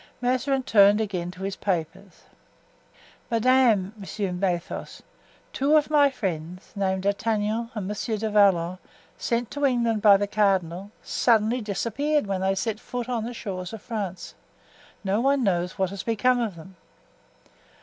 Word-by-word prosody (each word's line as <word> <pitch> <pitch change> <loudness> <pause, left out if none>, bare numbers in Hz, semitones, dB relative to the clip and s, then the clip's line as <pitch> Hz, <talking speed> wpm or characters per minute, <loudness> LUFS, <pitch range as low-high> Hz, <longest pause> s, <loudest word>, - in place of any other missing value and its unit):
Mazarin 255 +2 0
turned 205 -2 +5
again 185 -5 -2
to 185 +1 -9
his 195 0 -3
papers. 190 0 -4 1.1
"Madame," 230 -4 +3
resumed 195 -2 -4
Athos, 175 -3 -3 0.5
"two 290 +3 +3
of 300 0 0
my 290 -2 +5
friends, 180 - -5
named 190 -1 -1
D'Artagnan 215 +2 0
and 205 -3 -3
Monsieur 215 +2 -3
du 215 +1 -2
Vallon, 185 -4 +3 0.4
sent 235 0 -1
to 290 - -4
England 235 -5 +2
by 200 -2 +7
the 205 - 0
cardinal, 195 -3 0
suddenly 230 +1 +2
disappeared 270 +8 -1
when 195 -2 -2
they 190 0 +1
set 215 +2 -2
foot 245 -1 -5
on 235 -3 -2
the 240 - -5
shores 185 -2 -5
of 220 - -7
France; 200 -6 -5 0.7
no 200 +3 +1
one 275 0 +2
knows 180 -3 0
what 190 -1 0
has 200 - -5
become 245 +2 +1
of 220 -6 -2
them." 170 +3 -13
210 Hz, 150 wpm, -25 LUFS, 190-235 Hz, 1.1 s, by